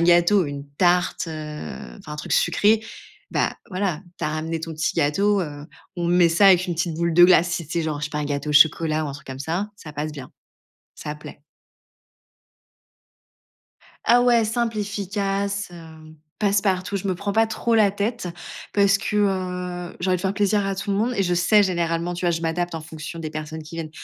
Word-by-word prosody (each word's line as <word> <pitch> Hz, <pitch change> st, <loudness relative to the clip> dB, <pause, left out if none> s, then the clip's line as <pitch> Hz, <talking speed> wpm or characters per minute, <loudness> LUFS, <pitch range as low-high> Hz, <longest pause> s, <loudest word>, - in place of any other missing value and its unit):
gâteau, 175 Hz, +2 st, +5 dB
une 145 Hz, 0 st, -7 dB
tarte, 180 Hz, -1 st, +2 dB
heu, 150 Hz, -, -7 dB
enfin, 150 Hz, -, -10 dB
un -, -, -5 dB
truc 150 Hz, -, -5 dB
sucré, 210 Hz, +6 st, +3 dB, 0.5 s
bah, -, -, 0 dB
voilà, 185 Hz, -4 st, -1 dB, 0.2 s
tu -, -, -3 dB
as -, -, +1 dB
ramené 160 Hz, +1 st, -3 dB
ton 165 Hz, 0 st, -5 dB
petit 160 Hz, +1 st, -1 dB
gâteau, 195 Hz, +7 st, +2 dB
heu, 145 Hz, -3 st, -6 dB, 0.3 s
on 170 Hz, -1 st, -1 dB
met 175 Hz, -1 st, +5 dB
ça 170 Hz, +5 st, +4 dB
avec 185 Hz, -1 st, +6 dB
une 175 Hz, -, -2 dB
petite 165 Hz, 0 st, -1 dB
boule 170 Hz, 0 st, 0 dB
de 175 Hz, +1 st, +8 dB
glace. 180 Hz, -1 st, +5 dB
Si 170 Hz, -2 st, -3 dB
tu 160 Hz, -, -8 dB
sais, -, -, 0 dB
genre, 155 Hz, -2 st, -3 dB
je -, -, -2 dB
sais 150 Hz, -, -5 dB
pas, 150 Hz, -, -3 dB
un 150 Hz, -, -1 dB
gâteau 145 Hz, +1 st, -2 dB
au -, -, -1 dB
chocolat 155 Hz, +1 st, +4 dB
ou 150 Hz, -, -3 dB
un -, -, -5 dB
truc 150 Hz, +4 st, -11 dB
comme 130 Hz, 0 st, -7 dB
ça, 175 Hz, +8 st, -2 dB
ça 155 Hz, -7 st, -10 dB
passe 150 Hz, +1 st, -4 dB
bien, 135 Hz, -4 st, -9 dB, 0.7 s
ça 150 Hz, 0 st, -6 dB
plaît. 150 Hz, -, -12 dB, 2.6 s
Ah 245 Hz, +1 st, +5 dB
ouais, 240 Hz, -2 st, +4 dB
simple, 230 Hz, 0 st, -1 dB
efficace, 200 Hz, -1 st, -2 dB
heu, 160 Hz, -2 st, -13 dB, 0.2 s
passe 200 Hz, -1 st, +2 dB
partout. 195 Hz, 0 st, 0 dB
Je 195 Hz, 0 st, -4 dB
me 185 Hz, -, 0 dB
prends 200 Hz, +3 st, -3 dB
pas 225 Hz, 0 st, +4 dB
trop 225 Hz, +1 st, -1 dB
la 215 Hz, -3 st, +5 dB
tête, 205 Hz, 0 st, -3 dB, 0.4 s
parce 200 Hz, -1 st, +4 dB
que, 210 Hz, -, -3 dB
heu, 180 Hz, -3 st, -2 dB
j'ai 180 Hz, -, -1 dB
envie 185 Hz, -, +3 dB
de -, -, -7 dB
faire 190 Hz, -1 st, 0 dB
plaisir 205 Hz, 0 st, +1 dB
à 195 Hz, -, -1 dB
tout 200 Hz, +1 st, -4 dB
le 195 Hz, -, +1 dB
monde 230 Hz, +5 st, +1 dB
et 200 Hz, -, +1 dB
je 180 Hz, -1 st, +1 dB
sais 205 Hz, +4 st, +4 dB
généralement, 170 Hz, -2 st, -1 dB
tu 175 Hz, -, -5 dB
vois? 175 Hz, -, +3 dB
Je 165 Hz, -1 st, -1 dB
m'adapte 170 Hz, +1 st, -2 dB
en 165 Hz, -, -4 dB
fonction 160 Hz, +1 st, -8 dB
des 160 Hz, -2 st, -5 dB
personnes 155 Hz, +1 st, -6 dB
qui 155 Hz, +2 st, -11 dB
viennent. 160 Hz, -2 st, -5 dB
175 Hz, 215 wpm, -23 LUFS, 155-200 Hz, 2.6 s, de